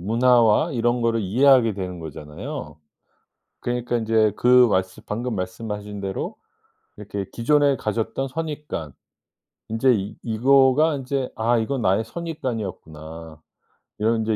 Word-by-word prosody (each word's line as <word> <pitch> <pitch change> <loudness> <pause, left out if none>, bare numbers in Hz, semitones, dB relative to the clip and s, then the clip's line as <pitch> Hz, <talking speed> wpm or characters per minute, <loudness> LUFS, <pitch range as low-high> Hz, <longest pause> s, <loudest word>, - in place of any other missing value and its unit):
문화와 120 - +3
이런 120 -1 +1
거를 115 -1 +1
이해하게 115 +2 +4
되는 90 -2 -5
거잖아요. 80 - -8 0.8
그러니까 120 0 -2
인제 110 -1 +2
그 125 0 +6
말씀 95 -1 -1
방금 115 +1 -3
말씀하신 105 +2 -5
대로 100 - -4 0.6
이렇게 100 -1 -5
기존에 140 +3 +2
가졌던 115 +5 -2
선입관 150 - -5 0.8
인제 115 +4 +3
이 100 0 -4
이거가 135 +6 +4
인제 135 -1 -3
'아 115 +2 +2
이건 120 +4 -1
나의 100 +1 +2
선입관이었구나.' 90 - -6 0.6
이런 115 +2 +2
인제 110 0 0
115 Hz, 295 characters per minute, -23 LUFS, 100-130 Hz, 0.8 s, 그